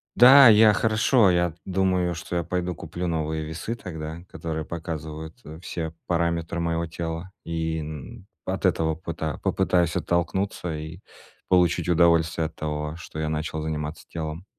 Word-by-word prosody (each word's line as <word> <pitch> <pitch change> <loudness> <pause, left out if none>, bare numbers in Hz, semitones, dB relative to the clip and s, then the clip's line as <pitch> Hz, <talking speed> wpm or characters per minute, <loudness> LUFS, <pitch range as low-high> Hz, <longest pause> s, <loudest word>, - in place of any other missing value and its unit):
Да, 130 +1 +10
я 105 0 +7
хорошо, 110 -1 +3
я 85 -2 +1
думаю, 90 -2 +1
что 85 +2 -6
я 85 - 0
пойду 90 +1 -2
куплю 85 +3 -5
новые 80 -1 -2
весы 80 +9 -4
тогда, 80 -4 -7
которые 80 -2 -4
показывают, 80 -1 -6
э, 80 +2 -9
все 80 -3 -4
параметры 85 -1 0
моего 85 0 0
тела, 80 +2 -5
и 80 -1 -2
н 80 - -8 0.2
от 95 +1 -2
этого 80 -3 +2
пыта 80 -4 -4
попытаюсь 90 -1 +2
оттолкнуться 85 0 -1
и 80 +4 -7 0.5
получить 90 -2 +3
удовольствие 85 -1 +3
от 80 - -14
того, 75 0 -3
что 80 -2 -8
я 75 - -1
начал 80 0 -3
заниматься 75 0 -4
телом. 80 +2 -5
85 Hz, 150 wpm, -25 LUFS, 80-90 Hz, 0.5 s, Да